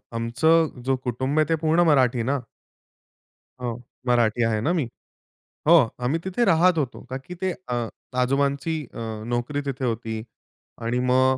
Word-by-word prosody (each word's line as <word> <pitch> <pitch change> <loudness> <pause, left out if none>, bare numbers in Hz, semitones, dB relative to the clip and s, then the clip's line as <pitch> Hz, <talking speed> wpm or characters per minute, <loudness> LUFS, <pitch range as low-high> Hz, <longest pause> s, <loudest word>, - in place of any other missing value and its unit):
आमचं 135 +5 +2
जो 135 - +3
कुटुंब 130 +5 0
आहे 155 - +4
ते - - +5
पूर्ण 160 +2 +4
मराठी 125 -4 +3
ना? 140 - +1 1.2
हो, 120 -1 -1 0.4
मराठी 120 -1 +3
आहे 110 -2 +1
ना 155 +9 +1
मी. 155 -8 0 0.8
हो, 170 - +8 0.2
आम्ही 130 +7 0
तिथे 190 +6 0
राहत 170 +1 +4
होतो. 130 - -5
का 130 - -3
की 180 - -7
ते 190 - +1 0.2
अ, 120 -2 -1 0.4
आजोबांची 140 +4 0 0.2
अ, - - -8 0.3
नोकरी 125 +5 -1
तिथे 130 -1 -3
होती. 115 -1 -2 0.7
आणि 120 +2 0
मग 130 +1 +3
130 Hz, 155 wpm, -24 LUFS, 120-155 Hz, 1.2 s, हो